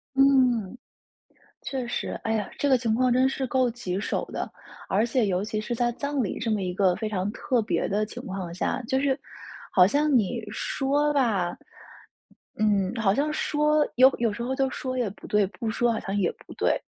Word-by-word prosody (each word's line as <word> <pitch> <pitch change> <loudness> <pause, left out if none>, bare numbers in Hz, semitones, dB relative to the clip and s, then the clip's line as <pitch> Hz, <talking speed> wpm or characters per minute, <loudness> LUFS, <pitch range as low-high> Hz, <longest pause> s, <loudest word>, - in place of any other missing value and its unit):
嗯， 255 -6 +3 0.9
确 260 -3 -3
实， 240 - -3
哎 225 - 0
呀， 210 -3 -1
这 285 - +1
个 265 - +5
情 230 -3 0
况 255 +1 +2
真 255 +2 +4
是 265 0 -2
够 255 -1 +2
棘 195 -6 -4
手 210 - -2
的。 - - -4 0.4
而 210 +4 +2
且 240 0 +1
尤 185 0 0
其 215 0 -3
是 225 +3 -3
在 240 +1 +1
葬 280 +1 -2
礼 200 - -3
这 230 - -2
么 210 -2 +1
一 180 -1 -2
个 185 -2 +3
非 220 0 -3
常 200 -1 -2
特 250 -1 0
别 215 - -1
的 210 +2 +1
情 245 +4 -8
况 185 -3 -5
下。 240 +8 -2
就 265 +3 0
是 275 -2 +1 0.5
好 180 -1 +7
像 290 +7 +2
你 225 +2 -1
说 290 +2 0
吧 210 -10 +1 1.0
嗯， 205 -1 +2
好 205 -4 +2
像 295 +5 0
说 300 0 +2
有 260 +2 +7
有 230 -3 +1
时 235 - -5
候 260 +2 -2
就 270 0 +1
说 255 -1 -4
也 240 - 0
不 - - -12
对， 210 -1 +2
不 220 +3 -4
说 240 +2 +1
好 220 - -2
像 195 - -4
也 190 -4 +2 0.2
不 - - -11
对。 - - +1
235 Hz, 220 characters per minute, -26 LUFS, 205-265 Hz, 1.0 s, 好